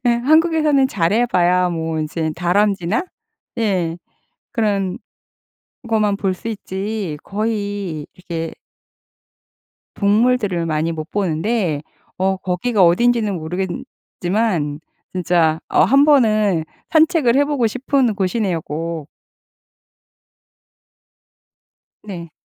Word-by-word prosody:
예. - - +5
한국에서는 310 -3 +4
잘 175 -5 0
해 240 +3 +3
봐야 180 -3 +2
뭐 160 -1 -2
인제 155 +1 -2
다람쥐나 195 - +1 0.5
예 180 -7 0 0.5
그런 200 -5 0 0.9
거만 215 -3 +2
볼 195 -2 -1
수 225 - -7
있지 200 -4 -4
거의 205 -6 -3
이렇게 165 -2 -5 1.4
동물들을 205 -4 +2
많이 160 +1 0
못 155 +1 -6
보는데 185 -3 -1 0.4
어 190 +1 +1
거기가 190 +4 0
어딘지는 215 +4 +3
모르겠지만 180 - -3 0.3
진짜 170 -3 +2
어 - - +4
1 275 +7 +5
번은 215 - +3 0.3
산책을 315 -6 +4
해 285 - +4
보고 285 -5 +1
싶은 260 0 +1
곳이네요 190 -2 0
꼭. 160 0 -5 3.0
네. 175 -6 -7
195 Hz, 195 characters per minute, -19 LUFS, 170-230 Hz, 3.0 s, 예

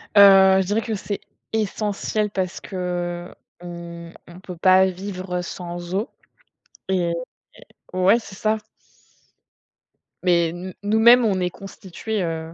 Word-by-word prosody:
Heu. 195 -1 +8
Je - - -2
dirais 205 +4 0
que 225 -1 -3
c'est 205 0 -5 0.3
essentiel 210 0 -1
parce 190 -2 -3
que, 175 -2 -4 0.3
on 170 -1 -8 0.2
on 175 +1 -12
peut 185 -2 -9
pas 185 +2 +5
vivre 185 -1 -4
sans 175 0 -7
eau 210 +4 -1 0.8
et 175 -3 +1 0.8
ouais, 185 +5 +4
c'est 200 -4 -11
ça. 215 +2 0 1.7
Mais 170 -2 +3
n 180 +2 -7
nous-mêmes, 225 +4 +6
on 195 -4 +1
est 180 -1 0
constitués, 195 +3 -6
heu, 165 -1 -4
185 Hz, 125 wpm, -22 LUFS, 175-205 Hz, 1.7 s, Heu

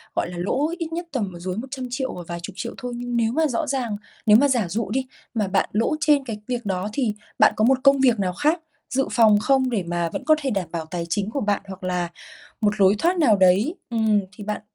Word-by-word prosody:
gọi - - 0
là, 175 - -7
lỗ 265 - 0
ít 325 -1 -4
nhất 345 +1 -3
mà - - -40
tầm 210 -9 -2
dưới 185 +2 -4
100.000.000 260 +1 -4
và 180 - -7
vài 170 0 -5
chục 185 +2 -7
triệu - - -4
thôi, 245 -1 -5
nhưng 245 0 -3
nếu 225 -1 +2
mà 320 +4 +2
rõ 240 -5 -1
ràng 245 -6 -1 0.3
nếu 215 -1 +7
mà 285 - +4
giả 235 -8 +1
dụ 210 +1 -2
đi 265 +2 0 0.3
mà 215 -4 0
bạn 190 - +1
lỗ 225 +8 +1
trên 295 -2 +4
cái 220 -4 -5
việc 245 -3 -3
đó 190 +1 -2
thì 240 -7 0 0.3
bạn - - +6
có 215 - +3
một 265 +1 +4
công 275 0 +6
việc 240 -5 +4
nào 180 -2 0
khác 305 - +1 0.3
dự 270 +1 0
phòng 220 -3 +5
không? 260 +3 +2
Để 210 -7 -1
mà 170 -1 -1
vẫn 270 - -5
có 310 +1 +6
thể 270 - -1
đảm 190 -4 -1
bảo 165 -2 -4
tài 170 +1 -4
chính 205 +2 -1
của 280 - -2
bạn 205 -1 0
hoặc 190 -1 -9
là 180 -1 -1 0.5
một 210 -1 +3
lối 195 +1 +5
thoát 355 +2 +2
nào 235 -11 +4
đấy, 195 - +4
ừm, 220 -3 +2
thì 205 0 -10
bạn 210 0 -3
225 Hz, 255 wpm, -23 LUFS, 195-265 Hz, 0.5 s, nếu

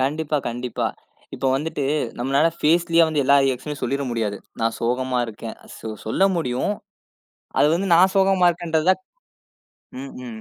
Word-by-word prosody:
கண்டிப்பா, 150 +3 0
கண்டிப்பா. 120 0 -3 0.5
இப்ப 135 - -2
வந்துட்டு 150 -1 -3 0.3
நம்மளால 135 +6 +2
ஃபேஸ்லயே 170 +2 +3
வந்து 155 -2 +1
எல்லா 140 +2 +5 0.2
எக்ஷன்னும் 145 +3 -7
சொல்லிற 140 +3 -1
முடியாது. 110 -3 -1 0.2
நான் 115 0 +1
சோகமா 125 +2 0
இருக்கேன். 115 0 -8 0.2
சொ - - -7 0.2
சொல்ல 110 - 0
முடியும். 130 +3 -1 0.9
அது - - +5
வந்து 190 +4 -1
நான் 185 +2 +5
சோகமா 190 -2 +4
இருக்கேன்றத 165 0 +1 1.1
ம், 135 0 -7
ம் 115 -3 -8
140 Hz, 140 wpm, -22 LUFS, 125-165 Hz, 1.1 s, எல்லா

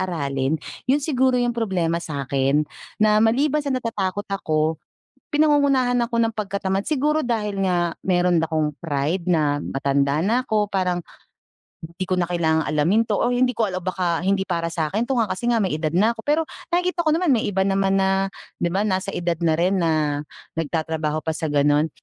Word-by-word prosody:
aralin. 145 -5 -1 0.3
Yun 265 - +5
siguro 265 -3 +1
yung 245 -1 +1
problema 180 -8 -1
sa'kin, 140 -1 0 0.3
na 215 0 +4
maliban 270 +7 +2
sa 290 - -4
natatakot 215 -6 -2
ako, 155 -4 0 0.5
pinagungunahan 285 -5 +3
ako 230 -1 0
ng 225 - +2
pagkatamad. 195 -1 -2
Siguro 300 0 +1
dahil 210 -4 -1
nga 175 -2 0
meron 180 -1 +3
akong 155 -2 -1
pride 160 +3 -2
na 150 -5 +2
matanda 140 +1 0
na 235 +7 +1
ako, 210 -2 0
parang 180 -3 0 0.8
hindi 170 +3 -6
ko 185 - -1
na 175 - -2
kailangang 160 -2 +1
alamin 155 +8 +3
'to, 220 -3 -1
o 245 - +1
hindi 250 0 +1
ko 225 - +2
alam, 185 -2 -3
baka 180 -2 -1
hindi 195 +1 +1
para 170 -3 -2
sa'kin 170 - -2
'to 265 - +1
nga, 230 - +3
kasi 235 +6 -2
nga 235 - +3
may 195 -7 0
edad 155 0 -1
na 215 +6 +3
ako. 225 - -10
Pero 295 +6 +1 0.3
nakikita 360 0 0
ko 320 - +1
naman 345 -6 +2
may 220 -3 +1
iba 190 -1 +1
naman 195 0 +2
na, 195 0 +1 0.3
di 170 - +1
ba, 195 +4 0
nasa 190 -1 -1
edad 175 -3 -2
na 160 -2 +2
rin 185 +2 +1
na 155 -3 +1 0.3
nagtatrabaho 160 -1 -2
pa 160 - -1
sa 155 0 -3
gano'n. 145 +2 +2
185 Hz, 185 wpm, -22 LUFS, 160-230 Hz, 0.8 s, Yun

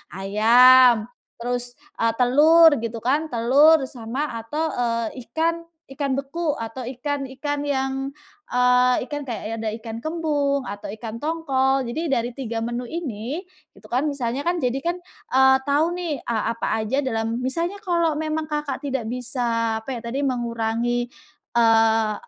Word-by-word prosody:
Ayam 230 +4 +6 0.3
terus, 245 +1 -3 0.2
eee, 230 0 +3
telur 310 +6 +6
gitu 230 0 -4
kan. 290 +6 +1
Telur 275 +6 +5
sama 260 +3 -4
atau, 260 +8 -3
eee, 235 0 -2
ikan 330 +6 -1 0.2
ikan 270 -1 -2
beku 305 +4 -2
atau 230 +3 -6
ikan-ikan 275 +3 -4
yang, 270 -1 -2 0.4
eee, 250 0 +3
ikan 290 +2 -4
kayak 225 -3 -5
ada 220 -1 -3
ikan 225 0 -7
kembung, 290 -5 -1
atau 205 0 -6
ikan 220 +1 -7
tongkol. 270 -2 0
Jadi, 310 +5 -3
dari 240 -1 -1
3 230 -4 -4
menu 240 +2 -3
ini 255 -1 -4 0.3
gitu - - -17
kan, 250 +3 0
misalnya 280 -2 -2
kan 345 0 0
jadi 250 -3 0
kan, 350 +1 -1 0.3
eee, 265 0 +6
tahu 290 +3 +2
nih, 335 -6 -3
eee, 230 -2 -2
apa 230 - -4 0.2
aja 265 +6 0
dalam 225 -3 -1
misalnya 335 +10 -2
kalau 340 -6 0
memang 310 0 -3
Kakak 295 -2 -3
tidak 265 -5 -2
bisa 235 -2 -1
apa 255 +4 -6
ya, 235 - -5
tadi 235 +4 -3
mengurangi, 240 -1 -1 0.5
eee, 225 -1 +4
255 Hz, 145 wpm, -23 LUFS, 230-290 Hz, 0.5 s, Ayam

